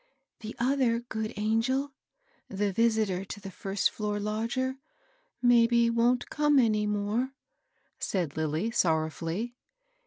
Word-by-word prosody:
"The 220 Hz, 0 st, -7 dB
other 240 Hz, -1 st, +2 dB
good 220 Hz, -2 st, -4 dB
angel, 235 Hz, +6 st, 0 dB, 0.3 s
— -, -, -43 dB, 0.3 s
the 200 Hz, 0 st, -1 dB
visitor 220 Hz, -4 st, +1 dB
to 205 Hz, -, -7 dB
the 195 Hz, -1 st, -8 dB
first 195 Hz, +1 st, -1 dB
floor 210 Hz, -1 st, -2 dB
lodger, 230 Hz, +6 st, -2 dB, 0.3 s
— -, -, -36 dB, 0.3 s
maybe 235 Hz, -1 st, +5 dB
wont 240 Hz, +2 st, +1 dB
come 295 Hz, -1 st, +3 dB
any 215 Hz, -4 st, +3 dB
more,'* 210 Hz, +6 st, -1 dB, 0.6 s
said 175 Hz, -7 st, -2 dB
Lilly, 160 Hz, +7 st, -1 dB
sorrowfully. 165 Hz, +3 st, 0 dB
220 Hz, 125 wpm, -29 LUFS, 205-245 Hz, 0.6 s, maybe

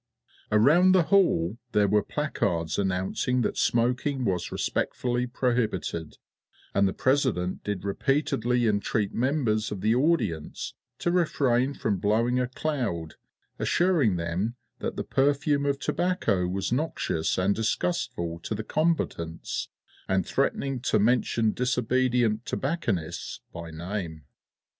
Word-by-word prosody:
Around 155 Hz, -, +5 dB
the 185 Hz, -2 st, +5 dB
hall 120 Hz, -, +2 dB
there 105 Hz, -1 st, +4 dB
were 105 Hz, +1 st, +3 dB
placards 85 Hz, -, -1 dB
announcing 95 Hz, +6 st, 0 dB
that -, -, -1 dB
smoking 125 Hz, +3 st, +1 dB
was 90 Hz, -4 st, -1 dB
respectfully 125 Hz, 0 st, -1 dB
prohibited, 115 Hz, -, -1 dB, 0.6 s
and 100 Hz, 0 st, +3 dB
the -, -, 0 dB
President 130 Hz, -10 st, 0 dB
did 100 Hz, -3 st, -3 dB
repeatedly 125 Hz, +1 st, +1 dB
entreat 105 Hz, -1 st, 0 dB
members 120 Hz, -4 st, 0 dB
of 100 Hz, -3 st, -4 dB
the 110 Hz, +3 st, +3 dB
audience 120 Hz, -, 0 dB, 0.2 s
to 175 Hz, -, 0 dB
refrain 140 Hz, -6 st, +2 dB
from 105 Hz, -3 st, -1 dB
blowing 115 Hz, +5 st, +2 dB
a 125 Hz, -, 0 dB
cloud, 125 Hz, -, -3 dB, 0.5 s
assuring 165 Hz, -, +2 dB
them 90 Hz, +7 st, -2 dB, 0.2 s
that -, -, -3 dB
the -, -, -3 dB
perfume 140 Hz, +1 st, +1 dB
of 140 Hz, -1 st, +1 dB
tobacco 125 Hz, -, 0 dB
was 95 Hz, +2 st, -2 dB
noxious 125 Hz, -, -1 dB
and 95 Hz, +2 st, +2 dB
disgustful 100 Hz, -, -1 dB
to 105 Hz, -, -4 dB
the 110 Hz, -, -4 dB
combatants, 105 Hz, -, -1 dB, 0.4 s
and 95 Hz, -2 st, +1 dB
threatening 135 Hz, -1 st, 0 dB
to 120 Hz, -3 st, +1 dB
mention 115 Hz, 0 st, +2 dB
disobedient 125 Hz, -2 st, +1 dB
tobacconists 110 Hz, -, -2 dB
by 85 Hz, 0 st, -7 dB
name. 85 Hz, -1 st, -5 dB
115 Hz, 120 wpm, -27 LUFS, 95-135 Hz, 0.6 s, Around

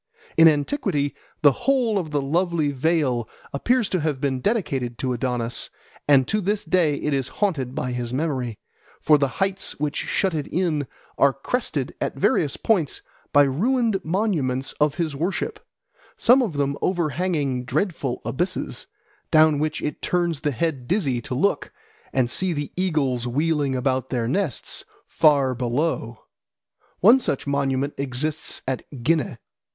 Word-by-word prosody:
In 165 Hz, -, +8 dB
antiquity 150 Hz, -, +1 dB, 0.3 s
the 145 Hz, -, +8 dB
whole 240 Hz, -, +1 dB
of 165 Hz, -4 st, -4 dB
the 145 Hz, -2 st, -1 dB
lovely 165 Hz, 0 st, +1 dB
vale 135 Hz, -5 st, 0 dB, 0.2 s
appears 240 Hz, -, +1 dB
to 185 Hz, -, 0 dB
have 150 Hz, -3 st, -1 dB
been 135 Hz, -2 st, -1 dB
dedicated 135 Hz, -, -1 dB
to 130 Hz, -1 st, -1 dB
Adonis, 120 Hz, -1 st, -2 dB, 0.4 s
and 135 Hz, -3 st, +5 dB
to 215 Hz, -, 0 dB
this 205 Hz, +2 st, -1 dB
day 170 Hz, -5 st, +2 dB
it 150 Hz, +1 st, -2 dB
is 135 Hz, -2 st, 0 dB
haunted 140 Hz, -11 st, 0 dB
by 130 Hz, -5 st, -2 dB
his 120 Hz, -1 st, -3 dB
memory; 130 Hz, -5 st, -2 dB, 0.4 s
for 150 Hz, -1 st, +4 dB
the 140 Hz, -, +2 dB
heights 195 Hz, -4 st, -1 dB
which 150 Hz, 0 st, -1 dB
shut 190 Hz, -3 st, 0 dB
it 150 Hz, -3 st, -2 dB
in 155 Hz, -5 st, 0 dB, 0.3 s
are 140 Hz, -, +6 dB
crested 140 Hz, -, -2 dB
at -, -, -1 dB
various 140 Hz, +1 st, +1 dB
points 180 Hz, -11 st, 0 dB, 0.3 s
by 145 Hz, -, +6 dB
ruined 215 Hz, -, +1 dB
monuments 155 Hz, -, 0 dB
of 150 Hz, -1 st, +3 dB
his 160 Hz, -5 st, -2 dB
worship, 170 Hz, +7 st, -2 dB, 0.6 s
some 250 Hz, +3 st, +5 dB
of 220 Hz, -9 st, -1 dB
them 140 Hz, 0 st, -1 dB
overhanging 155 Hz, -6 st, 0 dB
dreadful 140 Hz, -2 st, -2 dB
abysses, 180 Hz, +7 st, -2 dB, 0.4 s
down 155 Hz, -2 st, +5 dB
which 155 Hz, 0 st, -2 dB
it 150 Hz, -, -3 dB
turns 175 Hz, -4 st, 0 dB
the 150 Hz, -, 0 dB
head 140 Hz, -2 st, -2 dB
dizzy 145 Hz, -, 0 dB
to 125 Hz, -, -5 dB
look 200 Hz, +10 st, 0 dB, 0.4 s
and 130 Hz, -2 st, +2 dB
see 180 Hz, +8 st, 0 dB
the 145 Hz, -2 st, -4 dB
eagles 140 Hz, -10 st, 0 dB
wheeling 145 Hz, +1 st, 0 dB
about 130 Hz, 0 st, 0 dB
their 120 Hz, -3 st, -1 dB
nests 155 Hz, -, -1 dB, 0.2 s
far 140 Hz, -4 st, +3 dB
below. 120 Hz, -1 st, -2 dB, 0.8 s
One 230 Hz, +8 st, +7 dB
such 145 Hz, -, -2 dB
monument 140 Hz, 0 st, 0 dB
exists 140 Hz, +3 st, -1 dB
at 130 Hz, -2 st, -2 dB, 0.2 s
Ghineh. 155 Hz, -4 st, +1 dB
145 Hz, 150 wpm, -23 LUFS, 130-175 Hz, 0.8 s, In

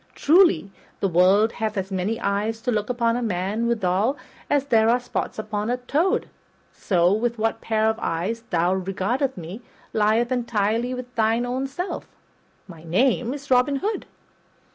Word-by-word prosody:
Truly, 335 Hz, -, +4 dB, 0.3 s
the 195 Hz, -, +1 dB
world 190 Hz, +5 st, +4 dB
hath 220 Hz, -2 st, -3 dB
as 195 Hz, 0 st, -3 dB
many 195 Hz, +5 st, -1 dB
eyes 210 Hz, +2 st, -1 dB
to 245 Hz, +2 st, -1 dB
look 210 Hz, -1 st, -1 dB
upon 235 Hz, -2 st, +1 dB
a 245 Hz, -, -1 dB
man 210 Hz, +2 st, -1 dB
withal 220 Hz, +3 st, +1 dB, 0.3 s
as 285 Hz, -1 st, +2 dB
there 225 Hz, -4 st, +3 dB
are 245 Hz, +2 st, +3 dB
spots 245 Hz, -, -4 dB
on 215 Hz, 0 st, -3 dB
a 245 Hz, -, 0 dB
toad; 295 Hz, +9 st, 0 dB, 0.5 s
so, 180 Hz, -1 st, +2 dB
with 235 Hz, +2 st, -1 dB
what 225 Hz, +1 st, -1 dB
pair 220 Hz, -1 st, 0 dB
of 220 Hz, 0 st, 0 dB
eyes 185 Hz, +8 st, -2 dB
thou 175 Hz, +1 st, +2 dB
regardest 195 Hz, +8 st, -1 dB
me 180 Hz, +7 st, -7 dB, 0.3 s
lieth 220 Hz, +3 st, +2 dB
entirely 240 Hz, 0 st, 0 dB
with 250 Hz, 0 st, -8 dB
thine 225 Hz, +1 st, +1 dB
own 255 Hz, +2 st, -2 dB
self. 350 Hz, +8 st, -5 dB, 0.6 s
My 165 Hz, -4 st, -12 dB
name 235 Hz, +7 st, +1 dB
is 280 Hz, 0 st, -7 dB
Robin 255 Hz, +3 st, +4 dB
Hood." 415 Hz, +10 st, -3 dB
225 Hz, 165 wpm, -23 LUFS, 200-250 Hz, 0.6 s, Truly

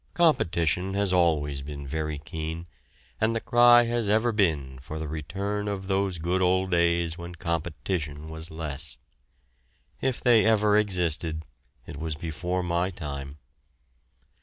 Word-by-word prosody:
Competition 90 Hz, -, +2 dB
has 100 Hz, -2 st, +1 dB
always 75 Hz, -6 st, +2 dB
been 70 Hz, 0 st, -7 dB
very 75 Hz, +1 st, -3 dB
keen, 80 Hz, +2 st, -5 dB, 0.6 s
and 110 Hz, +1 st, +2 dB
the -, -, +1 dB
cry 120 Hz, 0 st, +6 dB
has 115 Hz, -2 st, -1 dB
ever 110 Hz, +3 st, +3 dB
been 75 Hz, -, 0 dB
for 75 Hz, +4 st, -7 dB
the 80 Hz, 0 st, -4 dB
return 100 Hz, +7 st, -3 dB
of 100 Hz, -2 st, -3 dB
those 95 Hz, -1 st, 0 dB
good 90 Hz, +3 st, 0 dB
old 95 Hz, +1 st, +2 dB
days 85 Hz, -1 st, +2 dB
when 85 Hz, +1 st, -7 dB
competition 80 Hz, -2 st, -3 dB
was 80 Hz, +1 st, -5 dB
less. 75 Hz, -3 st, -3 dB, 1.0 s
If 130 Hz, -2 st, 0 dB
they 120 Hz, -3 st, +5 dB
ever 105 Hz, -2 st, +4 dB
existed, 85 Hz, -6 st, +1 dB, 0.4 s
it -, -, -8 dB
was 80 Hz, 0 st, -3 dB
before 90 Hz, +3 st, -3 dB
my 85 Hz, +1 st, 0 dB
time. 70 Hz, -5 st, -6 dB
85 Hz, 135 wpm, -27 LUFS, 80-100 Hz, 1.0 s, cry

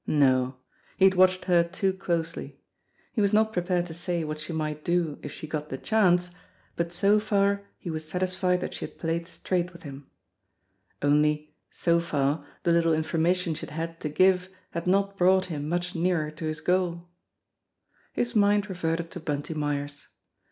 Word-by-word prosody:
No! 130 Hz, -3 st, +3 dB, 0.4 s
He 190 Hz, -, +5 dB
had 190 Hz, -, +6 dB
watched 185 Hz, 0 st, +4 dB
her 175 Hz, -2 st, +4 dB
too 190 Hz, +2 st, -1 dB
closely. 170 Hz, -3 st, -3 dB, 0.5 s
He 220 Hz, -, +1 dB
was 200 Hz, 0 st, +2 dB
not 220 Hz, +1 st, +3 dB
prepared 175 Hz, 0 st, 0 dB
to 170 Hz, -, -8 dB
say 170 Hz, 0 st, -2 dB
what 155 Hz, 0 st, -4 dB
she 155 Hz, +2 st, -6 dB
might 155 Hz, -1 st, -3 dB
do 170 Hz, -4 st, 0 dB
if 145 Hz, -, -6 dB
she -, -, -8 dB
got 150 Hz, -1 st, -4 dB
the 130 Hz, -, -4 dB
chance, 180 Hz, -2 st, +2 dB, 0.4 s
but 170 Hz, 0 st, -2 dB
so 200 Hz, +4 st, +4 dB
far 200 Hz, -1 st, +1 dB
he 175 Hz, -, -6 dB
was 155 Hz, 0 st, -5 dB
satisfied 180 Hz, +1 st, 0 dB
that -, -, -4 dB
she -, -, -4 dB
had -, -, -12 dB
played 170 Hz, 0 st, -2 dB
straight 180 Hz, -1 st, -2 dB
with 170 Hz, -, -14 dB
him 140 Hz, -1 st, -8 dB, 1.0 s
only, 150 Hz, +1 st, +2 dB, 0.2 s
so 170 Hz, -1 st, +2 dB
far, 145 Hz, -2 st, 0 dB, 0.2 s
the 175 Hz, -, +3 dB
little 165 Hz, -1 st, +3 dB
information 165 Hz, +2 st, +1 dB
she -, -, -6 dB
had 150 Hz, -, -10 dB
had 165 Hz, +1 st, -4 dB
to 150 Hz, -, -3 dB
give 185 Hz, +3 st, +3 dB, 0.2 s
had 170 Hz, +1 st, -4 dB
not 200 Hz, +1 st, +2 dB
brought 185 Hz, +1 st, +4 dB
him 145 Hz, 0 st, -4 dB
much 175 Hz, +1 st, -1 dB
nearer 165 Hz, -3 st, 0 dB
to 155 Hz, +1 st, -7 dB
his 155 Hz, 0 st, -3 dB
goal. 175 Hz, -1 st, 0 dB, 1.0 s
His 240 Hz, 0 st, -2 dB
mind 205 Hz, 0 st, +3 dB
reverted 165 Hz, -2 st, -2 dB
to 180 Hz, -, -6 dB
Bunty 145 Hz, 0 st, -3 dB
Myers. 145 Hz, -1 st, -3 dB
170 Hz, 180 wpm, -27 LUFS, 155-185 Hz, 1.0 s, had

